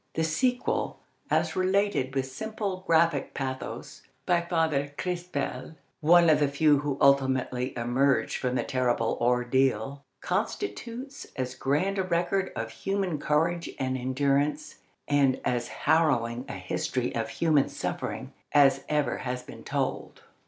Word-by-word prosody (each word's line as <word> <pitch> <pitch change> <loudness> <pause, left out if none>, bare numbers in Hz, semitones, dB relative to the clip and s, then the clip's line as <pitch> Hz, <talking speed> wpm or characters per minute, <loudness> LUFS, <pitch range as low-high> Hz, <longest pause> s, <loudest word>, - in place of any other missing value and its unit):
The 160 - +1
sequel, 245 +11 0 0.3
as - - +1
related 185 -8 +1
with 135 -1 +1
simple, 195 +6 -4
graphic 165 -4 +2
pathos 135 +2 -5 0.2
by 175 -1 +3
Father 160 -5 0
Crespel, 165 -6 -3 0.2
one 170 +2 +6
of 155 - +5
the 145 - +3
few 145 0 +3
who 145 -1 -2
ultimately 130 -2 +2
emerged 125 +3 +1
from 125 -1 -1
the 120 - +1
terrible 120 -3 0
ordeal, 125 +1 +1 0.2
constitutes 240 - -4
as 130 -1 -3
grand 150 +10 0
a - - +2
record 185 +2 0
of 115 0 -4
human 195 - -2
courage 165 +4 +1
and 130 -1 -1
endurance 140 +3 0 0.3
and 140 -2 +3
as 120 -1 0
harrowing 125 -7 +1
a - - -4
history 95 +7 -2
of 115 -1 -2
human 150 0 +2
suffering - - -4 0.2
as 140 -2 +5
ever 150 -1 +1
has 125 0 -4
been - - -11
told. - - -3
140 Hz, 130 wpm, -28 LUFS, 130-170 Hz, 0.3 s, one